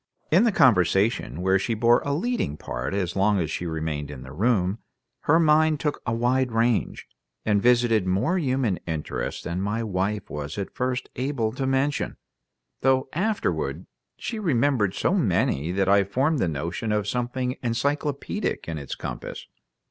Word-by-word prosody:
In 185 +9 +5
the 230 - +4
conversation, 95 - +3
where 95 +1 +3
she 115 +4 -1
bore 120 +2 +4
a 140 - -2
leading 165 - -1
part - - -4
as 90 -4 -1
long 100 +1 +3
as 80 -3 -1
she 85 - -3
remained 80 -3 -3
in 70 -3 -8
the - - -10
room, 100 +2 +1 0.5
her 160 +3 +5
mind 155 -1 +4
took 150 -2 -2
a - - +1
wide 125 +2 +1
range, 115 0 0 0.4
and 105 -2 +2
visited 120 -4 +3
more 120 - +1
human 130 - 0
interests 75 -7 -3
than 85 +2 -3
my 105 +4 -1
wife 105 0 -2
was 75 +3 -6
at 100 - -4
first 125 0 -2
able 125 -4 -1
to 130 +3 -3
mention, 135 +2 0 0.6
though 130 0 +2
afterward 215 +6 -1 0.3
she 225 - -4
remembered 130 - +1
so 170 - +1
many 90 - +1
that 95 +1 0
I 100 0 +5
formed 135 +10 +1
the 95 - +1
notion 85 +8 -3
of 105 -1 0
something 125 +2 -2
encyclopedic 140 - -2
in 80 -2 -3
its 70 - -6
compass. - - -6
115 Hz, 165 wpm, -25 LUFS, 95-135 Hz, 0.6 s, In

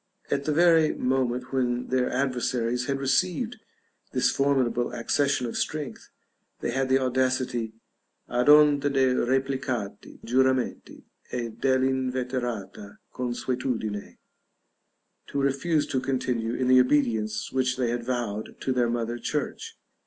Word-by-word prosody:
At 140 0 0
the 155 - +1
very 165 0 +4
moment 125 0 -1
when 125 -1 0
their 130 -1 +1
adversaries 125 -2 -1
had 140 -1 0
received 185 - 0 0.6
this - - +3
formidable 130 -4 +1
accession 135 +3 +1
of 115 - -5
strength, 150 -3 -3 0.5
they - - -2
had 135 +1 0
the 130 - +5
audacity 130 -3 0 0.5
"ad 125 +3 +1
onta 150 -1 +6
de' 130 -2 +3
replicati 130 -5 -2
giuramenti, 130 +1 0 0.3
e 120 -2 -2
dell'inveterata 125 -4 -1 0.2
consuetudine," 125 -4 -3 1.1
to 140 - -3
refuse 140 +3 +1
to 130 - -1
continue 125 -3 -1
in 130 - 0
the 130 0 +7
obedience 110 -6 +1
which 130 -1 0
they 125 -3 0
had 120 0 -2
vowed 115 -4 -3
to 130 - -1
their 120 -2 +1
mother 120 0 -2
church. 300 - -4
130 Hz, 125 wpm, -26 LUFS, 120-135 Hz, 1.1 s, the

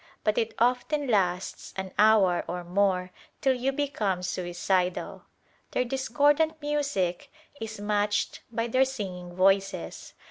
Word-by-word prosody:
But 215 - +2
it 225 -1 -2
often 250 +5 +1
lasts 190 -6 -1
an 190 -1 -4
hour 210 -5 +5
or 180 0 -4
more 185 0 +1 0.3
till 265 - +3
you 255 +2 0
become 220 -10 -1
suicidal. 180 0 -1 0.5
Their 250 - +1
discordant 290 +5 +2
music 285 - -1 0.3
is 220 -1 -6
matched 205 0 0
by 230 0 -1
their 255 +3 +3
singing 185 -9 -5
voices. 195 +1 +1
210 Hz, 120 wpm, -27 LUFS, 185-260 Hz, 0.5 s, hour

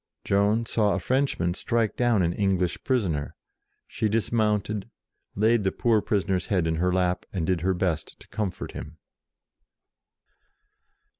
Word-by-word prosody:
Joan 105 +3 +2
saw 105 -2 +1
a - - -1
French 135 +8 0
man 85 0 +1
strike 115 +3 0
down 120 -6 +2
an 85 0 +1
English 95 -3 0
prisoner: 95 - -1 0.5
she 110 - -2
dismounted, 105 -2 0 0.5
laid 110 +2 +3
the 95 - +1
poor 115 -4 +2
prisoner's 95 -4 0
head 90 -5 +1
in 80 0 0
her 90 +2 +1
lap, 90 -1 +1
and 90 -5 -2
did 90 -1 0
her 95 +1 +1
best 90 -3 -2
to - - -15
comfort 100 -4 -4
him. 80 +1 -8
100 Hz, 145 wpm, -26 LUFS, 90-110 Hz, 0.5 s, laid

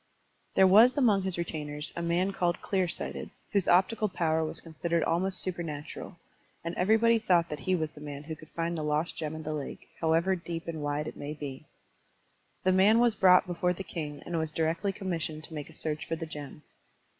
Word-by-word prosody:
There 190 - +7
was 225 +8 +7
among 220 -8 +4
his 190 -2 -1
retainers 150 -3 -2
a 170 - -3
man 175 +3 +1
called 175 -2 0
Clear 190 -3 0
Sighted, - - -3 0.2
whose 200 -4 +2
optical 205 +4 +3
power 160 -3 +1
was 155 - -4
consid 165 +1 -6
ered 170 -1 +3
almost 185 +3 +1
supernatural, 170 -1 -5 0.5
and 170 +1 -3
everybody 225 +5 +4
thought 175 -5 +3
that 150 - -4
he 185 +3 +1
was 155 -3 -2
the 150 - -13
man 145 -1 -7
who 160 +1 -6
could 155 0 -15
find 170 +1 -2
the 160 - -3
lost 150 +2 0
gem 155 -1 -4
in 160 - -6
the 155 0 -3
lake, 145 -2 -6
however 165 +4 +2
deep 170 -1 -6
and 160 -2 -4
wide 145 +1 -1
it - - -7
might 145 +1 -6
be. 135 -3 -6 1.0
The 185 - +4
man 195 +4 +5
was 240 -1 +4
brought 185 -3 +6
before 180 0 0
the 195 - -6
king 150 -5 -6
and 170 -1 -2
was 160 -1 -2
directly 165 +5 0
commissioned 170 -6 -4
to 160 - -9
make 150 -2 -6
a - - -14
search 155 -1 -3
for 165 - -1
the 165 0 -5
gem. 150 -1 -9
170 Hz, 210 wpm, -29 LUFS, 155-185 Hz, 1.0 s, There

